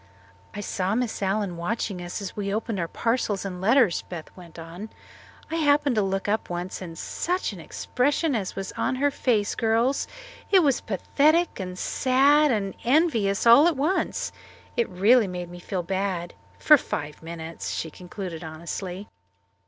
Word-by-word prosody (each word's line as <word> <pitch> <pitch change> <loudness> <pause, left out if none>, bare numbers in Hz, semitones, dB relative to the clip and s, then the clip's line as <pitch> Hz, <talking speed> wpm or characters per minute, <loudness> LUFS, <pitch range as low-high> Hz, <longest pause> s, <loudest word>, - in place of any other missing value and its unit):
"I 205 - -4
saw 195 0 -1
Miss 245 -3 -2
Allen 195 -2 -1
watching 195 +1 -2
us 175 +4 -5
as 190 - -6
we 200 -1 -2
opened 215 -1 -2
our 170 - -1
parcels 225 -2 -1
and 180 -2 -5
letters," 225 -1 +4
Beth 170 -3 -8
went 175 -3 -13
on. 170 +6 -8 0.6
"I 325 - 0
happened 290 -3 +3
to 215 - +2
look 195 0 -1
up 215 +2 0
once, 175 +2 -4
and 165 -3 -7
such 360 - -2
an 190 - -9
expression 280 - 0
as 205 -6 -2
was 195 0 -4
on - - -1
her 285 +2 +2
face, 225 -7 +1
girls! 230 +4 +1 0.4
It 380 -3 +6
was 275 -4 +2
pathetic 305 - +2
and 185 -1 -5
sad 280 +7 +3
and 200 -6 0
envious 235 - +2
all 235 +7 +8
at 335 -5 +1
once. 310 +8 0 0.4
It 235 - +1
really 205 +5 +4
made 180 -1 -6
me 175 - -9
feel 180 0 -3
bad 185 -1 -2 0.2
for 300 - +7
five 150 - -5
minutes," 165 0 -6
she 160 - -3
concluded 180 -1 -7
honestly. 175 +4 -6
200 Hz, 165 wpm, -25 LUFS, 180-255 Hz, 0.6 s, all